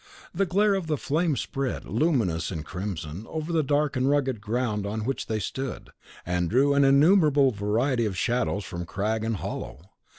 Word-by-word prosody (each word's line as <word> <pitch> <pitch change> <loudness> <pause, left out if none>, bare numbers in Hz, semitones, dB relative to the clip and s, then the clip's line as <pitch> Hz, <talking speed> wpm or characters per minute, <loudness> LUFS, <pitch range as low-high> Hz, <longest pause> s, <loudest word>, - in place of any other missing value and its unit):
The 195 +2 +1
glare 200 +4 +3
of 190 -4 -2
the 155 -2 0
flame 155 +3 0
spread, 135 0 -3
luminous 110 - 0
and 80 -5 -5
crimson, 90 +1 -5
over 160 +1 -4
the 160 - +3
dark 145 0 +1
and 130 +1 +1
rugged 135 -6 +1
ground 110 -1 -1
on 110 +1 -3
which 135 +2 -2
they 110 - -1
stood, 130 +5 -5 0.3
and 90 -1 0
drew 140 +4 +3
an 140 0 +4
innumerable 145 -1 +5
variety 115 +4 0
of 95 -3 -4
shadows 120 -1 0
from 85 0 -6
crag 110 +4 -1
and 115 0 -1
hollow. 90 -1 -6
125 Hz, 175 wpm, -26 LUFS, 105-145 Hz, 0.3 s, innumerable